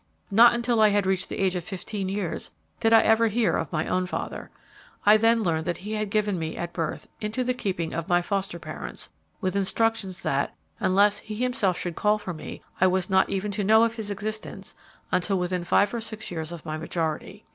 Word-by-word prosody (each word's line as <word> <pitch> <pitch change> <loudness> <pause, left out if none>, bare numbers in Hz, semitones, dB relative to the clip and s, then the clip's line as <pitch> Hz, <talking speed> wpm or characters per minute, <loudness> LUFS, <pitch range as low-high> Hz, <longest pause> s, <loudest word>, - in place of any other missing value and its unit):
Not 235 +4 +7
until 235 -1 +1
I 215 - +7
had 205 -1 +2
reached 190 -1 0
the - - -4
age 190 -1 +1
of 180 - -2
fifteen 190 +2 -4
years 195 -4 -3 0.3
did 225 - +2
I 225 - +8
ever 225 +1 +4
hear 225 +1 +1
of 160 - -2
my 155 -1 0
own 185 0 0
father. - - -5 0.6
I 210 +1 +8
then 225 +1 +3
learned 160 -3 0
that 175 +2 -3
he 210 - -4
had 215 -1 -2
given 205 -3 0
me, 160 0 -4
at 175 0 -4
birth, 165 -3 -3
into 215 +4 -1
the 250 0 0
keeping 185 -9 -3
of 165 0 -3
my 175 0 +3
foster 195 -1 -2
parents, 70 - -7 0.3
with 185 +1 -1
instructions 200 -1 0
that, 140 +1 0 0.2
unless 205 +2 +3
he 215 - -7
himself 220 -6 +1
should 175 -2 -4
call 210 0 +2
for 190 -4 -6
me, 155 - -8 0.2
I 185 - +7
was 185 +1 0
not 190 0 +4
even 195 +1 -2
to 205 +1 -2
know 220 +3 +6
of 230 -1 +1
his 220 -3 -6
existence 215 +2 -5 0.4
until 190 +2 +1
within 180 0 -1
five 200 +4 +3
or 235 - -2
six 220 -2 -6
years 160 -1 -4
of 170 -2 -8
my 155 0 -4
majority. 160 -1 -3
195 Hz, 215 wpm, -26 LUFS, 175-215 Hz, 0.6 s, I